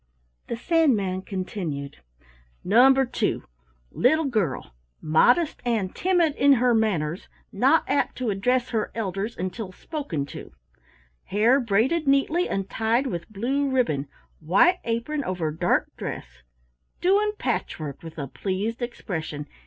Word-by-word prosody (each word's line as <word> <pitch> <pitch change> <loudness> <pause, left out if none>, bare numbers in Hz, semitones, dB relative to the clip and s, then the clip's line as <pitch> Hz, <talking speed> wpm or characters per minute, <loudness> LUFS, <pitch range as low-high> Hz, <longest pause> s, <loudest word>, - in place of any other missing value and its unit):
The 235 - -3
Sandman 230 - +1
continued: 175 -8 -5 0.7
"Number 265 +6 +5
two. 245 - -1 0.5
Little 315 +6 +2
girl: 200 - -1 0.3
modest 245 - +3
and 220 -6 -1
timid 345 -5 +2
in 280 0 +6
her 250 -1 +3
manners, 185 -7 0 0.2
not 270 +10 +3
apt 285 - 0
to 250 -4 -1
address 250 +6 0
her 220 -3 -1
elders 205 0 -3
until 185 +3 -4
spoken 185 - -4
to - - -10 0.7
hair 225 +7 +3
braided 255 +8 +1
neatly 275 +6 +2
and 195 -1 -2
tied 225 +5 0
with 175 -10 -4
blue 265 +7 -1
ribbon 155 - 0 0.3
white 265 - +4
apron 235 +6 -2
over 180 -7 -2
dark 155 - +1
dress - - -7 0.6
doing 410 +3 +2
patchwork 150 - -3
with 165 -1 -10
a 145 - -3
pleased 200 - -3
expression. 160 -11 -5
225 Hz, 125 wpm, -25 LUFS, 185-270 Hz, 0.7 s, in